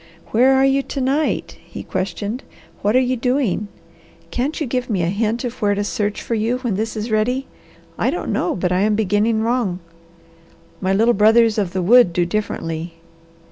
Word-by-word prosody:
"Where 255 Hz, +4 st, +4 dB
are 265 Hz, 0 st, +4 dB
you 270 Hz, 0 st, +3 dB
to 275 Hz, -, -6 dB
night?" 275 Hz, +4 st, -1 dB
he -, -, -9 dB
questioned. 205 Hz, +6 st, -3 dB, 0.4 s
"What 210 Hz, +3 st, +1 dB
are -, -, +6 dB
you 255 Hz, 0 st, +1 dB
doing? 250 Hz, -5 st, 0 dB, 0.6 s
Can't 270 Hz, +5 st, -2 dB
you 305 Hz, -, -1 dB
give 250 Hz, 0 st, -2 dB
me 190 Hz, -6 st, 0 dB
a 165 Hz, -, +1 dB
hint 220 Hz, +5 st, -1 dB
of 245 Hz, 0 st, -5 dB
where 205 Hz, -1 st, +2 dB
to 205 Hz, -, -1 dB
search 205 Hz, 0 st, -2 dB
for -, -, -3 dB
you 225 Hz, +3 st, 0 dB
when 245 Hz, -4 st, -2 dB
this 220 Hz, +3 st, -3 dB
is 215 Hz, +2 st, -4 dB
ready? 250 Hz, +5 st, +1 dB, 0.5 s
I -, -, +2 dB
don't -, -, -2 dB
know 335 Hz, -, 0 dB
but 180 Hz, -1 st, -1 dB
I 180 Hz, -, +2 dB
am 210 Hz, +2 st, +2 dB
beginning 215 Hz, +2 st, +1 dB
wrong. 230 Hz, -6 st, 0 dB, 1.0 s
My 190 Hz, 0 st, 0 dB
little 225 Hz, +5 st, +3 dB
brothers 220 Hz, +1 st, +4 dB
of 190 Hz, -4 st, -2 dB
the 185 Hz, -1 st, -1 dB
wood 230 Hz, -2 st, +6 dB
do 175 Hz, 0 st, +1 dB
differently. 170 Hz, -4 st, -3 dB
220 Hz, 190 wpm, -20 LUFS, 200-250 Hz, 1.0 s, are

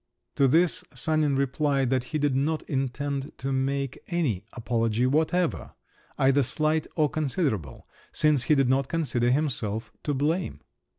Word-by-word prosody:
To 140 Hz, -, +5 dB
this 165 Hz, +6 st, +3 dB
Sanin 155 Hz, -3 st, +1 dB
replied 135 Hz, -1 st, +1 dB
that 130 Hz, -1 st, +1 dB
he 155 Hz, -, -3 dB
did 145 Hz, -3 st, +1 dB
not 155 Hz, +4 st, 0 dB
intend 135 Hz, +1 st, -3 dB
to 135 Hz, +1 st, -3 dB
make 135 Hz, 0 st, -1 dB
any 145 Hz, -, -1 dB
apology 115 Hz, 0 st, 0 dB
whatever, 160 Hz, +5 st, 0 dB, 0.4 s
either 135 Hz, +1 st, +4 dB
slight 155 Hz, +4 st, 0 dB
or 155 Hz, -2 st, +3 dB
considerable, 135 Hz, -, -2 dB, 0.2 s
since 150 Hz, -5 st, +2 dB
he 155 Hz, -, +4 dB
did 135 Hz, -2 st, +3 dB
not 130 Hz, +1 st, +2 dB
consider 125 Hz, -7 st, 0 dB
himself 120 Hz, -6 st, -1 dB
to 145 Hz, -, -1 dB
blame. 160 Hz, +6 st, -1 dB
140 Hz, 140 wpm, -26 LUFS, 130-155 Hz, 0.4 s, To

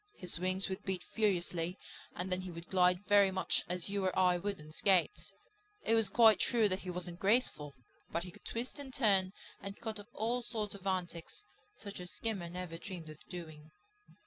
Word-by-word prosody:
His 180 Hz, -2 st, +1 dB
wings 185 Hz, +1 st, +3 dB
would 190 Hz, +1 st, -4 dB
beat 190 Hz, -2 st, -2 dB
furiously 180 Hz, -4 st, 0 dB, 0.4 s
and 180 Hz, +1 st, -3 dB
then 185 Hz, 0 st, +1 dB
he 185 Hz, -, -6 dB
would 170 Hz, 0 st, -8 dB
glide 180 Hz, +1 st, +3 dB
very 205 Hz, -1 st, +6 dB
much 190 Hz, 0 st, 0 dB
as 180 Hz, -1 st, -2 dB
you 200 Hz, 0 st, -1 dB
or 185 Hz, -, 0 dB
I 180 Hz, -1 st, +5 dB
would 200 Hz, +3 st, -3 dB
on 150 Hz, 0 st, -11 dB
skates. 190 Hz, -, +2 dB, 0.5 s
It 225 Hz, -, +2 dB
was 225 Hz, -3 st, +4 dB
quite 220 Hz, -2 st, +6 dB
true 230 Hz, -3 st, +3 dB
that 185 Hz, 0 st, +1 dB
he 185 Hz, -, -7 dB
wasn't 175 Hz, -1 st, -4 dB
graceful. 195 Hz, -, +1 dB, 0.4 s
But 170 Hz, -, -1 dB
he 180 Hz, -, -8 dB
could -, -, -16 dB
twist 240 Hz, +5 st, -4 dB
and 275 Hz, -2 st, -6 dB
turn 200 Hz, -8 st, +3 dB, 0.3 s
and 200 Hz, 0 st, -7 dB
cut 220 Hz, -2 st, -4 dB
up 205 Hz, +2 st, -11 dB
all 240 Hz, +2 st, 0 dB
sorts 220 Hz, -3 st, -3 dB
of 195 Hz, -1 st, -8 dB
antics, 185 Hz, -, -3 dB, 0.3 s
such 200 Hz, -2 st, -8 dB
as 180 Hz, 0 st, -6 dB
Skimmer 175 Hz, +2 st, -3 dB
never 175 Hz, -1 st, -6 dB
dreamed 170 Hz, -5 st, -7 dB
of 155 Hz, -, -13 dB
doing. 155 Hz, -4 st, -8 dB
185 Hz, 200 wpm, -34 LUFS, 175-205 Hz, 0.5 s, very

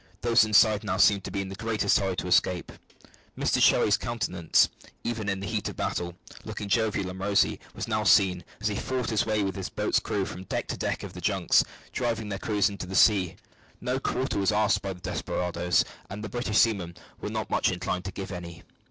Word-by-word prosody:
Those 115 Hz, -2 st, +5 dB
inside 110 Hz, 0 st, +4 dB
now 95 Hz, -3 st, -1 dB
seemed 100 Hz, 0 st, +4 dB
to -, -, -4 dB
be 100 Hz, -, -2 dB
in 95 Hz, -, -5 dB
the -, -, -6 dB
greatest 110 Hz, -1 st, +1 dB
hurry 95 Hz, -2 st, -1 dB
to 90 Hz, -, -3 dB
escape. 90 Hz, 0 st, +2 dB, 0.7 s
Mr -, -, +1 dB
Cherry's 105 Hz, -, +5 dB
countenance, 95 Hz, -8 st, +1 dB, 0.4 s
even 110 Hz, -3 st, -2 dB
in 95 Hz, -1 st, -2 dB
the -, -, -4 dB
heat 110 Hz, -1 st, -2 dB
of -, -, -8 dB
battle, 85 Hz, 0 st, -3 dB, 0.3 s
looking 105 Hz, -, -6 dB
jovial 105 Hz, -4 st, 0 dB
and 95 Hz, -, -9 dB
rosy, 100 Hz, +1 st, +2 dB, 0.2 s
was -, -, -4 dB
now -, -, 0 dB
seen, 90 Hz, -2 st, +4 dB, 0.2 s
as 110 Hz, -, -1 dB
he 105 Hz, -, -3 dB
fought 125 Hz, +2 st, -2 dB
his 110 Hz, 0 st, +1 dB
way 105 Hz, -1 st, +1 dB
with 95 Hz, -2 st, -2 dB
his 95 Hz, -3 st, -4 dB
boat's -, -, +1 dB
crew 100 Hz, -2 st, -2 dB
from 95 Hz, 0 st, -8 dB
deck -, -, -3 dB
to -, -, -1 dB
deck -, -, -2 dB
of -, -, -7 dB
the -, -, -8 dB
junks, -, -, +3 dB, 0.3 s
driving 115 Hz, -4 st, -2 dB
their 95 Hz, -1 st, -4 dB
crews 105 Hz, 0 st, +1 dB
into 100 Hz, -3 st, -5 dB
the 95 Hz, -, -5 dB
sea. 95 Hz, -5 st, +4 dB, 0.4 s
No 125 Hz, +1 st, -1 dB
quarter 130 Hz, -5 st, -1 dB
was 100 Hz, +1 st, +2 dB
asked 105 Hz, 0 st, +2 dB
by 95 Hz, -1 st, -3 dB
the 90 Hz, -, -15 dB
desperadoes, 90 Hz, -1 st, 0 dB, 0.2 s
and 105 Hz, +2 st, -6 dB
the 105 Hz, -, -5 dB
British 110 Hz, -1 st, -1 dB
seamen 90 Hz, -7 st, +2 dB, 0.2 s
were -, -, -4 dB
not -, -, -4 dB
much -, -, +2 dB
inclined 90 Hz, 0 st, -3 dB
to 95 Hz, -, -4 dB
give 95 Hz, 0 st, -6 dB
any. 85 Hz, -2 st, -8 dB
100 Hz, 215 wpm, -27 LUFS, 95-110 Hz, 0.7 s, Those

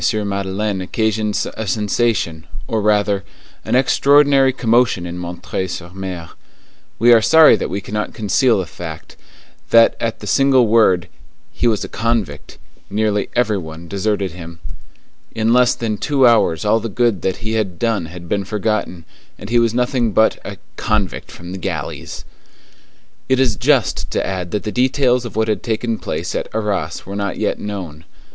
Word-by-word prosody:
Madeleine 100 Hz, 0 st, -2 dB
occasioned 110 Hz, +2 st, -1 dB
a 110 Hz, -, -5 dB
sensation, 100 Hz, -5 st, 0 dB, 0.2 s
or 110 Hz, -, -1 dB
rather, 105 Hz, -1 st, +1 dB, 0.4 s
an -, -, -1 dB
extraordinary 140 Hz, +1 st, +4 dB
commotion 120 Hz, -7 st, +1 dB
in 90 Hz, +1 st, -6 dB
M. 85 Hz, 0 st, -6 dB, 0.3 s
sur 85 Hz, -1 st, -7 dB
M. 95 Hz, -3 st, -6 dB, 0.7 s
We 120 Hz, +1 st, +6 dB
are 115 Hz, -, +6 dB
sorry 160 Hz, +5 st, +7 dB
that -, -, -3 dB
we 100 Hz, -, -3 dB
cannot 105 Hz, +2 st, -4 dB
conceal 110 Hz, +3 st, +2 dB
the 95 Hz, -, -2 dB
fact, 80 Hz, -2 st, -9 dB, 0.5 s
that 115 Hz, 0 st, +6 dB
at 115 Hz, -1 st, -2 dB
the -, -, -9 dB
single 130 Hz, +3 st, +4 dB
word, 110 Hz, -6 st, +3 dB, 0.4 s
"He 120 Hz, -, -1 dB
was 110 Hz, -3 st, +1 dB
a -, -, -5 dB
convict," 115 Hz, -10 st, -3 dB, 0.3 s
nearly 105 Hz, 0 st, 0 dB
every 110 Hz, -4 st, +1 dB
one 80 Hz, 0 st, -9 dB
deserted 100 Hz, 0 st, -1 dB
him. 85 Hz, -1 st, -10 dB, 0.8 s
In 110 Hz, +1 st, +2 dB
less 125 Hz, 0 st, +4 dB
than 110 Hz, -3 st, -3 dB
two 140 Hz, -3 st, +2 dB
hours 110 Hz, -8 st, +3 dB
all 110 Hz, +2 st, +3 dB
the 115 Hz, -, -5 dB
good 115 Hz, -2 st, +1 dB
that 95 Hz, -, -1 dB
he 110 Hz, -, -2 dB
had 105 Hz, -6 st, -1 dB
done 115 Hz, -7 st, -1 dB
had 85 Hz, +1 st, -10 dB
been 100 Hz, +2 st, -1 dB
forgotten, 105 Hz, -4 st, -2 dB, 0.3 s
and 100 Hz, -, -9 dB
he 120 Hz, -, +4 dB
was 115 Hz, -1 st, +2 dB
nothing 125 Hz, -3 st, 0 dB
but 110 Hz, +2 st, +3 dB
a -, -, -7 dB, 0.2 s
"convict 105 Hz, -4 st, -1 dB
from 85 Hz, +1 st, -10 dB
the 95 Hz, -, -6 dB
galleys." 80 Hz, -7 st, -5 dB, 1.0 s
It 130 Hz, 0 st, +3 dB
is 125 Hz, -5 st, +2 dB
just 130 Hz, +1 st, +1 dB
to -, -, -1 dB
add 90 Hz, -2 st, -3 dB
that 105 Hz, -, -3 dB
the 105 Hz, -, -3 dB
details 125 Hz, 0 st, +2 dB
of 115 Hz, -, -7 dB
what 110 Hz, 0 st, +1 dB
had 110 Hz, -, -1 dB
taken 115 Hz, 0 st, -2 dB
place -, -, -4 dB
at -, -, -3 dB
Arras 100 Hz, -7 st, -2 dB
were 100 Hz, -, -7 dB
not 100 Hz, 0 st, -3 dB
yet 105 Hz, -, -1 dB
known. 90 Hz, -7 st, -6 dB
105 Hz, 170 wpm, -18 LUFS, 95-115 Hz, 1.0 s, sorry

